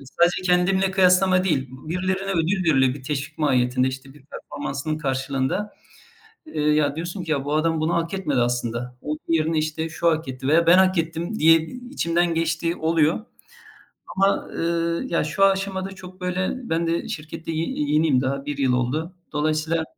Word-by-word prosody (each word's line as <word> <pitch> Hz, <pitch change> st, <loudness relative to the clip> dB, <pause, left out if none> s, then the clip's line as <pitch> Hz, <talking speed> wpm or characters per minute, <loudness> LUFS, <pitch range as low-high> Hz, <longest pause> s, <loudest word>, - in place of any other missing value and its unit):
E, 140 Hz, -, -13 dB
sadece 175 Hz, +7 st, +1 dB
kendimle 185 Hz, +2 st, +2 dB
kıyaslama 185 Hz, 0 st, +4 dB
değil. 135 Hz, -8 st, 0 dB
B 130 Hz, +4 st, -12 dB
birilerine 185 Hz, +2 st, -1 dB
ödül 175 Hz, +3 st, +1 dB
veriliyor. 130 Hz, -2 st, +3 dB
Bir 140 Hz, -, -10 dB
teşvik 150 Hz, +2 st, -4 dB
mahiyetinde, 130 Hz, -3 st, +2 dB
işte, 135 Hz, +1 st, -8 dB
bir 145 Hz, -, -17 dB
performansının 145 Hz, +2 st, -5 dB
karşılığında. 135 Hz, +7 st, -2 dB, 0.7 s
Eee, 155 Hz, -, -3 dB
ya, 150 Hz, -1 st, +2 dB
diyorsun 175 Hz, +2 st, -4 dB
ki, 160 Hz, -, -6 dB
"Ya, 140 Hz, -2 st, -1 dB
bu 145 Hz, +1 st, -1 dB
adam 160 Hz, +1 st, +1 dB
bunu 160 Hz, +2 st, 0 dB
hak 170 Hz, +2 st, -1 dB
etmedi 150 Hz, -10 st, 0 dB
aslında. 120 Hz, 0 st, -2 dB
Onun 150 Hz, 0 st, -3 dB
yerine, 160 Hz, -1 st, +1 dB
işte, 155 Hz, +1 st, -2 dB
şu 170 Hz, +2 st, 0 dB
hak 160 Hz, -3 st, -2 dB
etti 130 Hz, +1 st, -5 dB
veya 165 Hz, +2 st, +4 dB
ben 175 Hz, +3 st, +7 dB
hak 190 Hz, -1 st, +4 dB
ettim." 170 Hz, +6 st, -2 dB
diye, 165 Hz, +1 st, +6 dB
iii, 250 Hz, +6 st, -10 dB
içimden 170 Hz, -8 st, +1 dB
geçtiği 165 Hz, +1 st, 0 dB
oluyor. 160 Hz, +2 st, +2 dB, 1.0 s
Ama, 195 Hz, +1 st, +2 dB
ııı, 170 Hz, 0 st, -1 dB
ya, 170 Hz, -, +1 dB
şu 170 Hz, +6 st, +1 dB
aşamada 195 Hz, 0 st, 0 dB
çok, 185 Hz, -1 st, -12 dB
böyle, 180 Hz, +3 st, -1 dB, 0.2 s
ben 165 Hz, +1 st, +1 dB
de 165 Hz, +1 st, -1 dB
şirkette 160 Hz, +1 st, -6 dB
y 155 Hz, -, -2 dB
ye 145 Hz, -1 st, -2 dB
yeniyim. 150 Hz, -4 st, +3 dB
Daha 135 Hz, +2 st, -2 dB
1 145 Hz, -, -4 dB
yıl 135 Hz, -2 st, +2 dB
oldu. 135 Hz, +8 st, -1 dB, 0.2 s
Dolayısıyla, 155 Hz, +2 st, 0 dB
160 Hz, 180 wpm, -23 LUFS, 145-180 Hz, 1.0 s, ben